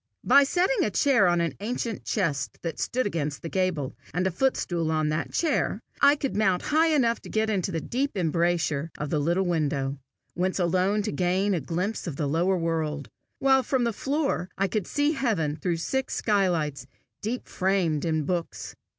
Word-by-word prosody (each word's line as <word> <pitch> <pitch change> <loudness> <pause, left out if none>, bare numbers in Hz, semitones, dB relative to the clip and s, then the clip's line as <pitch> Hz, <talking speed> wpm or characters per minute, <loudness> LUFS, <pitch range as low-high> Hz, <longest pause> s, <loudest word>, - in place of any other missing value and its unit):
By 280 0 +6
setting 370 - +2
a - - +1
chair 220 -1 +3
on 175 -1 +2
an 165 -4 -1
ancient 230 +1 -3
chest 150 -10 -1
that 165 -3 -4
stood 255 +1 0
against 150 -7 -3
the 165 - -4
gable, 180 -8 -1 0.2
and 180 +1 +1
a 190 - +1
footstool 175 -7 0
on 155 -1 +1
the 155 +2 -1
chair, 330 - 0 0.2
I 280 +1 +7
could 275 -2 -3
mount 195 -4 +2
high 320 +2 +5
enough 255 -8 +2
to - - -11
get 220 0 0
into 190 -2 -1
the 165 -2 -2
deep 270 -1 -2
embrasure 165 -3 0
of 150 -1 -4
the 155 - +1
little 170 +6 +1
window, 145 -5 -1 0.3
whence 185 +2 -1
alone 185 +3 +1
to - - -2
gain 185 +5 +1
a 170 - 0
glimpse 180 +9 -3
of 155 - -4
the 150 - -2
lower 175 +6 +1
world, 160 -4 -2 0.3
while 265 -1 +4
from 255 0 0
the 235 -1 0
floor 275 - -1
I 195 - +2
could 210 0 -2
see 290 +1 +1
heaven 215 - 0
through 170 +2 -1
six 265 +10 -2
skylights, 165 - 0 0.3
deep 235 +4 -3
framed 185 -6 0
in 160 -2 0
books. 165 - -3
180 Hz, 185 wpm, -26 LUFS, 160-225 Hz, 0.3 s, I